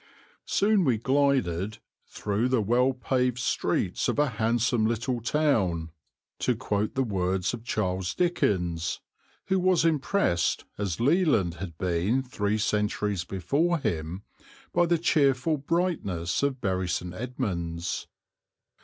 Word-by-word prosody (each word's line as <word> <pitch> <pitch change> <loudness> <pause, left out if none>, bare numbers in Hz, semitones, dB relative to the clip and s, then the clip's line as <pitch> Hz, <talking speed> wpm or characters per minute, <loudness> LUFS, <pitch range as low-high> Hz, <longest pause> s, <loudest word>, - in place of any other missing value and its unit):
Soon 205 -1 +3
we 130 -7 +2
glided 115 -7 +1 0.3
"through 105 +4 -1
the 130 -2 +2
well 120 +5 +3
paved 125 -1 0
streets 125 - 0
of - - 0
a 145 -1 +3
handsome 115 0 +1
little 120 +2 -1
town," 105 - +1 0.5
to 125 - +1
quote 105 -3 -2
the 135 - +2
words 95 -3 -1
of 115 -2 -6
Charles 95 -5 -1
Dickens, 90 - 0 0.5
who 190 0 +3
was 180 -2 +3
impressed, 150 - +1
as 100 -5 -3
Leland 140 - +3
had 85 -5 -6
been 95 +9 0
three 105 -4 -1
centuries 105 -2 0
before 140 - 0
him, 85 - -3 0.5
by 175 0 +3
the 170 0 +3
cheerful 150 -2 +2
brightness 140 - -1
of 140 -2 0
Bury 95 -4 -1
St. 90 0 -2
Edmunds. 90 -8 -3
115 Hz, 125 wpm, -27 LUFS, 95-140 Hz, 0.5 s, Soon